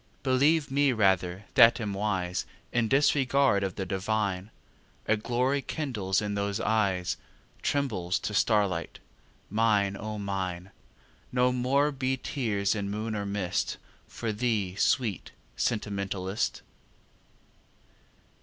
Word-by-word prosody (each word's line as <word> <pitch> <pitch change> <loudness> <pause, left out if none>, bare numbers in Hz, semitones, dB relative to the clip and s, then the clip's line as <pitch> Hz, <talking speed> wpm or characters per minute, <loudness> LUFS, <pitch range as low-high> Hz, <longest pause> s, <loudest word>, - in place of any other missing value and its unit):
Believe 140 +3 +3
me 140 0 +3
rather 95 -3 +1
that 115 +2 +7
am 105 -3 -3
wise 95 -3 -1 0.3
In 120 -2 +2
disregard 135 -4 +3
of 95 -2 -2
the 95 - -3
divine, 100 0 -1 0.6
A 105 - +4
glory 125 +5 0
kindles 110 - -1
in 105 0 -2
those 100 +1 -1
eyes 100 -6 +1 0.4
Trembles 105 -11 0
to 105 - -3
starlight. 100 -5 +1 0.5
Mine, 105 -2 +2
O 110 +1 -5
Mine! 95 -2 -4 0.6
No 125 0 +3
more 135 +4 +2
be 130 -1 -1
tears 110 -7 -1
in 100 -2 -3
moon 110 +2 -3
or 100 -1 -3
mist 100 -3 -1 0.3
For 115 -2 -4
thee, 105 -5 0
sweet 110 - +1 0.3
sentimentalist. 100 -3 -2
105 Hz, 115 wpm, -28 LUFS, 100-125 Hz, 0.6 s, that